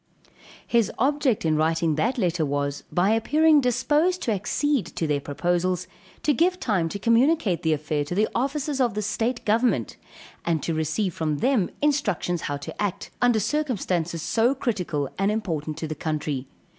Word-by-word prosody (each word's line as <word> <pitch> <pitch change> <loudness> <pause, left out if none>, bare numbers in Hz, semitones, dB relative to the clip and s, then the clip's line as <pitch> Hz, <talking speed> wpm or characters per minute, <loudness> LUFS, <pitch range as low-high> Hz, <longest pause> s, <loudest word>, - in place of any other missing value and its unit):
His 235 -4 +2
object 270 - +1
in 155 -1 +2
writing 160 +1 +1
that 220 - 0
letter 175 -6 +1
was, 140 -1 -2
by 185 +4 +2
appearing 300 +7 +4
disposed 295 +8 +1
to 230 - 0
accede 265 +6 0
to 165 - -1
their 150 -2 +1
proposals, 175 +5 -1 0.4
to 295 - +3
give 360 +7 +2
time 190 - 0
to 200 - -4
communicate 230 - +2
the 160 -1 +2
affair 150 0 -1
to 175 - -4
the 215 +2 +3
officers 275 +2 -1
of 240 -5 +1
the 210 - -1
state 230 +4 -2
government, 215 - +1 0.5
and 165 -3 0
to 165 - -1
receive 160 +5 -1
from 155 -2 -1
them 230 - +2
instructions 205 - 0
how 145 - -2
to 140 - -8
act, 205 -3 -3
under 245 -3 +4
circumstances 195 - -1
so 230 +9 +2
critical 180 - -2
and 195 +1 +2
important 160 -8 -3
to 160 - -4
the 155 - -3
country. 150 -3 -3
200 Hz, 170 wpm, -25 LUFS, 160-250 Hz, 0.5 s, appearing